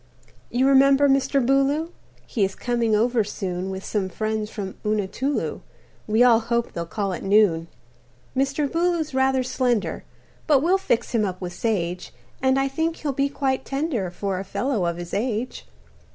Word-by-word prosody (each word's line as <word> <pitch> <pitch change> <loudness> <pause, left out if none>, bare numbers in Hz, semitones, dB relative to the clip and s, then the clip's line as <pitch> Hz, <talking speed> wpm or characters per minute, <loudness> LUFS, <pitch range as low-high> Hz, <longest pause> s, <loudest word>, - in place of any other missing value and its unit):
"You 255 +2 +2
remember 275 +1 +5
Mr. 275 -1 +2
Booloo? 275 +5 +2 0.3
He 215 - -1
is 195 0 0
coming 235 -3 0
over 230 +1 +2
soon 190 -2 -4
With 190 0 -6
some 200 -3 -1
friends 215 +1 -2
from 195 -4 -5
Unatulu 215 +7 -1 0.5
We 220 +3 +4
all 235 -2 +6
hope 235 +1 -1
they'll 170 0 -4
call 200 0 -2
at - - -5
noon. 195 -5 +3 0.7
"Mr. 275 +2 +1
Booloo's 335 -1 0
rather 265 0 +2
slender, 245 -4 -1 0.4
But 290 -3 +4
we'll 370 +4 +3
fix 240 -11 0
him 230 -3 +2
up 185 -3 -3
with 180 -1 -5
sage, 180 -5 -2 0.3
And 265 0 +3
I 270 - +1
think 320 +4 -1
he'll 290 -4 -3
be 275 +1 +1
quite 265 -2 -1
tender 270 - -2
For 190 +1 -3
a - - -4
fellow 200 0 -1
of 170 0 -2
his 175 0 -8
age. 230 +3 -2
235 Hz, 165 wpm, -24 LUFS, 200-275 Hz, 0.7 s, all